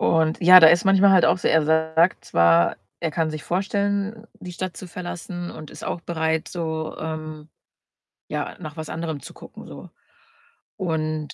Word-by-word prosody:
Und, 160 Hz, -1 st, +1 dB
ja, 180 Hz, +1 st, +9 dB
der 160 Hz, -1 st, +8 dB
ist 175 Hz, +2 st, +2 dB
manchmal 195 Hz, 0 st, +5 dB
halt 185 Hz, -2 st, +5 dB
auch 185 Hz, -, +3 dB
so -, -, -1 dB
er 160 Hz, -1 st, +3 dB
sagt 160 Hz, +3 st, +1 dB
zwar, 85 Hz, +1 st, +3 dB, 0.2 s
er 165 Hz, -2 st, -2 dB
kann 160 Hz, 0 st, -1 dB
sich 155 Hz, -1 st, -7 dB
vorstellen, 200 Hz, +3 st, -2 dB
die 180 Hz, -2 st, -9 dB
Stadt 185 Hz, +1 st, -5 dB
zu 185 Hz, -, -9 dB
verlassen 175 Hz, 0 st, -7 dB
und 155 Hz, -2 st, -10 dB
ist -, -, -12 dB
auch 170 Hz, -, -4 dB
bereit 160 Hz, -1 st, -2 dB
so, 160 Hz, -2 st, -5 dB
ähm, 155 Hz, -1 st, -7 dB, 0.8 s
ja, 150 Hz, -1 st, -4 dB
nach 155 Hz, -2 st, -9 dB
was 155 Hz, -, -6 dB
anderem 160 Hz, -3 st, -5 dB
zu -, -, -11 dB
gucken -, -, -13 dB
so. -, -, -11 dB, 0.9 s
Und 155 Hz, -3 st, -3 dB
160 Hz, 175 wpm, -23 LUFS, 155-180 Hz, 0.9 s, ja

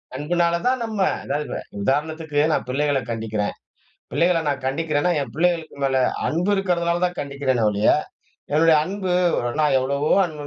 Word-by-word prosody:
அன்புனால 170 Hz, +4 st, +1 dB
தான் 255 Hz, 0 st, +1 dB
நம்ம. 220 Hz, -2 st, -5 dB, 0.2 s
அதாவது 145 Hz, +2 st, -2 dB
இப்ப, -, -, -4 dB, 0.2 s
உதாரணத்துக்கு 150 Hz, +4 st, -1 dB
நான் -, -, 0 dB
பிள்ளைகள 145 Hz, +1 st, +1 dB
கண்டிக்கிறேன். 110 Hz, -3 st, -2 dB, 0.6 s
பிள்ளைகள 175 Hz, 0 st, +2 dB
நான் 140 Hz, -2 st, -3 dB
கண்டிக்கிறேன்னா 150 Hz, +4 st, 0 dB
என் 140 Hz, -, -5 dB
பிள்ளைகளுக்கு 165 Hz, 0 st, 0 dB
மேல 135 Hz, -1 st, +2 dB, 0.3 s
அன்பு 175 Hz, +5 st, 0 dB
இருக்கிறதுனால 175 Hz, -3 st, 0 dB
தான் 180 Hz, 0 st, -4 dB
கண்டிக்கிறேனே 140 Hz, -4 st, -1 dB
ஒழிய, 105 Hz, +1 st, +2 dB, 0.6 s
என்னுடைய 160 Hz, +1 st, +5 dB
அன்பு 190 Hz, 0 st, -3 dB, 0.3 s
ஒரு 120 Hz, -, -1 dB
நான் 150 Hz, -3 st, +3 dB
எவ்வளவோ 140 Hz, +3 st, -1 dB
அன்பு 155 Hz, -3 st, -8 dB
150 Hz, 150 wpm, -22 LUFS, 135-170 Hz, 0.6 s, என்னுடைய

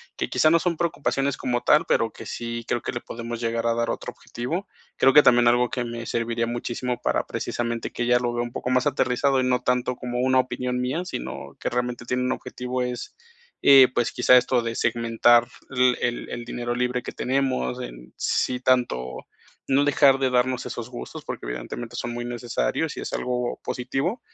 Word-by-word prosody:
que -, -, -3 dB
quizá 155 Hz, -, +4 dB
no 165 Hz, -, +5 dB
son 170 Hz, -1 st, -1 dB
preocupaciones 140 Hz, -4 st, 0 dB
como 120 Hz, -2 st, -1 dB
tal, 150 Hz, +2 st, +4 dB
pero 115 Hz, -1 st, +1 dB
que -, -, -10 dB
sí 115 Hz, 0 st, -5 dB
creo 120 Hz, -, 0 dB
que -, -, -4 dB
le 120 Hz, -, -4 dB
podemos 115 Hz, 0 st, -6 dB
llegar 115 Hz, 0 st, -1 dB
a 115 Hz, -, +3 dB
dar 115 Hz, 0 st, -1 dB
otro -, -, -4 dB
objetivo. 165 Hz, -, -5 dB, 0.3 s
Creo 135 Hz, -, +5 dB
que 150 Hz, -, +9 dB
también 120 Hz, -1 st, +6 dB
algo 120 Hz, 0 st, +3 dB
que 125 Hz, -, -2 dB
me 120 Hz, 0 st, -6 dB
serviría 115 Hz, 0 st, -1 dB
muchísimo 120 Hz, +1 st, -3 dB
para -, -, 0 dB
precisamente 120 Hz, -1 st, -3 dB
que -, -, -3 dB
ella 120 Hz, 0 st, +4 dB
lo 120 Hz, -1 st, -1 dB
vea 120 Hz, 0 st, -1 dB
un 120 Hz, 0 st, -7 dB
poco -, -, -3 dB
más 130 Hz, 0 st, +2 dB
aterrizado, 130 Hz, +2 st, +2 dB
y -, -, 0 dB
no 125 Hz, 0 st, +2 dB
tanto 125 Hz, 0 st, 0 dB
como 125 Hz, 0 st, -4 dB
una 130 Hz, 0 st, +3 dB
opinión 125 Hz, -1 st, -1 dB
mía, 130 Hz, +8 st, -1 dB
sino 180 Hz, -, -6 dB
que -, -, -2 dB
realmente 125 Hz, -1 st, -2 dB
tiene 125 Hz, +1 st, -1 dB
un 125 Hz, -, 0 dB
objetivo 125 Hz, 0 st, -4 dB
es, 125 Hz, -1 st, -4 dB, 0.5 s
eh, 135 Hz, -2 st, +8 dB
pues, 120 Hz, -2 st, 0 dB
quizá 125 Hz, -, +6 dB
esto 125 Hz, 0 st, +2 dB
de 115 Hz, 0 st, -3 dB
segmentar 115 Hz, 0 st, +3 dB, 0.3 s
l 125 Hz, -1 st, +3 dB
el 120 Hz, 0 st, -2 dB
el 120 Hz, -1 st, -5 dB
dinero 120 Hz, 0 st, -3 dB
libre 125 Hz, 0 st, -1 dB
que -, -, -5 dB
tenemos, 130 Hz, -, -1 dB
en -, -, -9 dB
sí 125 Hz, -1 st, 0 dB
tanto, 120 Hz, -, 0 dB, 0.4 s
no 140 Hz, +2 st, +4 dB
dejar 140 Hz, -1 st, +5 dB
de 135 Hz, -1 st, 0 dB
darnos 125 Hz, 0 st, +1 dB
esos 120 Hz, 0 st, -6 dB
gustos, 125 Hz, -, -8 dB
porque -, -, -6 dB
evidentemente 65 Hz, -, -6 dB
son 120 Hz, -, -3 dB
muy 120 Hz, 0 st, -4 dB
necesarios 120 Hz, -, -2 dB
y -, -, -4 dB
es -, -, -6 dB
algo 125 Hz, -1 st, -2 dB
positivo, 135 Hz, -, -2 dB
125 Hz, 200 wpm, -24 LUFS, 120-130 Hz, 0.5 s, que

